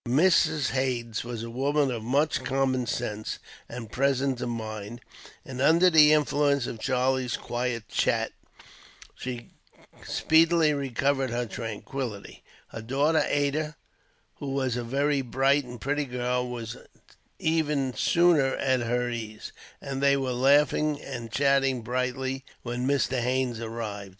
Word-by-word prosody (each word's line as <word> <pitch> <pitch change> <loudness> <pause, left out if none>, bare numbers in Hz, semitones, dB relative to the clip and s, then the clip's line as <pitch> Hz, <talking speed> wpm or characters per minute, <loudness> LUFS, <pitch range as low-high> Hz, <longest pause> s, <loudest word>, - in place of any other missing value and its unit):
Mrs. 155 +1 +3
Haines 120 -4 -1
was 120 -1 -5
a 115 - -6
woman 140 +2 +1
of 115 -2 -3
much 140 +7 +1
common 130 -2 0
sense 110 -3 -3 0.3
and 115 -2 -8
presence 135 -1 +1
of - - -2
mind; 110 -1 -5 0.5
and, 130 -1 -6
under 170 +5 +5
the 150 -2 +7
influence 145 -3 +2
of 115 - -6
Charlie's 130 0 0
quiet 120 -2 -3
chat, - - 0 0.8
she 120 -2 -7 0.5
speedily 160 -1 +3
recovered 135 0 0
her 120 +1 -2
tranquillity. 115 0 -6 0.3
Her 110 - -7
daughter 140 +7 +2
Ada, 150 +2 0 0.6
who 145 - -6
was 135 -3 -1
a 125 - -2
very 140 +4 +1
bright 135 +3 +2
and 120 -1 -9
pretty 145 +4 -1
girl, 125 0 -2
was 115 -2 -6 0.6
even 150 -5 0
sooner 165 -2 +3
at 130 -2 +1
her 120 +1 0
ease, 110 -3 -6 0.3
and 135 -1 -5
they 140 0 +4
were 130 -2 -1
laughing 145 +3 +3
and 120 -4 -7
chatting 135 -1 +2
brightly, 130 +2 -2 0.2
when 120 +1 -3
Mr. 135 -2 +1
Haines 125 -1 0
arrived. 110 -3 -5
130 Hz, 135 wpm, -27 LUFS, 120-140 Hz, 0.8 s, the